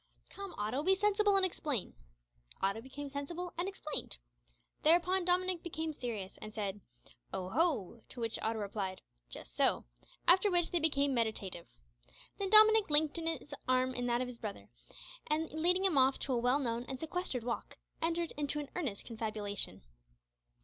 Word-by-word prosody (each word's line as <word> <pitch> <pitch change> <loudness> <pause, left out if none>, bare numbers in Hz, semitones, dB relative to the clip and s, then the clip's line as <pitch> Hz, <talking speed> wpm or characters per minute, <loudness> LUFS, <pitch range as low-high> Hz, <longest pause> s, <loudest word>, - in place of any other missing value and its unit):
"Come, 395 -1 -8
Otto, 215 +7 -1
be 380 +5 +3
sensible 415 +1 +3
and 385 - +4
explain." 295 - -2 0.7
Otto 195 +3 0
became 275 +3 -7
sensible 320 +6 -5
and 345 +3 -2
explained. 305 - -3 0.6
Thereupon 355 +3 +4
Dominick 365 -1 +1
became 320 -2 -4
serious, 220 -8 -5
and 215 0 -8
said 205 -2 -3 0.5
"Oho!" 230 - 0
To 250 - -10
which 230 -1 -2
Otto 225 0 -1
replied 200 -2 -4 0.3
"Just - - -10
so," - - +2 0.4
after 370 +4 +7
which 350 -2 +3
they 345 - +2
became 285 -3 +2
meditative. 215 -7 -2 0.7
Then 395 -1 -1
Dominick 435 -1 +8
linked 300 +1 +5
his 325 -3 -3 0.2
arm 255 0 +2
in 245 -1 -2
that 240 0 +1
of 255 - -2
his 250 -1 -8
little 210 -2 -3
brother, - - -17 0.6
and, 310 +1 -1
leading 355 +5 +2
him 335 -8 +4
off 265 +1 +4
to 270 - -1
a 240 - +1
well 245 +3 +3
known 235 -4 -2
and 260 0 -6
sequestered 320 -6 -3
walk, 235 0 -4 0.2
entered 335 0 0
into 295 0 -2
an 290 - -7
earnest 270 - -3
confabulation. 210 - -3
285 Hz, 165 wpm, -33 LUFS, 230-345 Hz, 0.7 s, Dominick